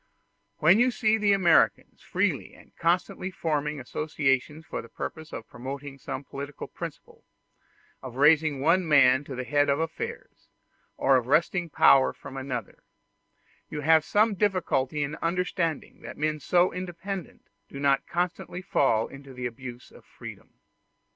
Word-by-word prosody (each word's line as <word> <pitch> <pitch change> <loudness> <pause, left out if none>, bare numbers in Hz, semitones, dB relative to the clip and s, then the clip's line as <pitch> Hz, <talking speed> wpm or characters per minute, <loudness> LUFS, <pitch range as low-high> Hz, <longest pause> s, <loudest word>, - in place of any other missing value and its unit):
When 175 +7 +5
you 245 +1 +5
see 220 -2 +1
the 205 -1 +3
Americans 185 -4 +3
freely - - -1
and - - -20
constantly 180 +2 0
forming 150 -4 -2
associations 150 +2 -1
for - - -5
the - - -14
purpose 160 0 -7
of 115 - -7
promoting 135 +3 -7
some 135 - -5
political 140 +1 -7
principle, - - -9 0.8
of 130 -2 -8
raising 150 0 +4
one 170 +4 +3
man 135 -3 +5
to 135 - -7
the 130 - -3
head 145 +2 +2
of 140 - +3
affairs, 160 +1 -5 0.5
or 135 0 +4
of 125 -1 -2
wresting 170 +4 +2
power 135 -2 +5
from 130 - -11
another, 130 -3 -5 0.9
you 150 - -4
have 160 +1 +5
some 210 +5 +3
difficulty 180 -8 0
in 145 +2 -4
understanding 170 -2 -2
that - - -9
men 155 +1 -1
so 175 +5 +2
independent 185 0 -6 0.3
do 140 - -8
not 140 -1 +2
constantly 180 +1 -3
fall 115 - +2
into 135 -1 -12
the 125 0 -5
abuse 120 0 -7
of - - -16
freedom. - - -12
150 Hz, 145 wpm, -27 LUFS, 135-175 Hz, 0.9 s, When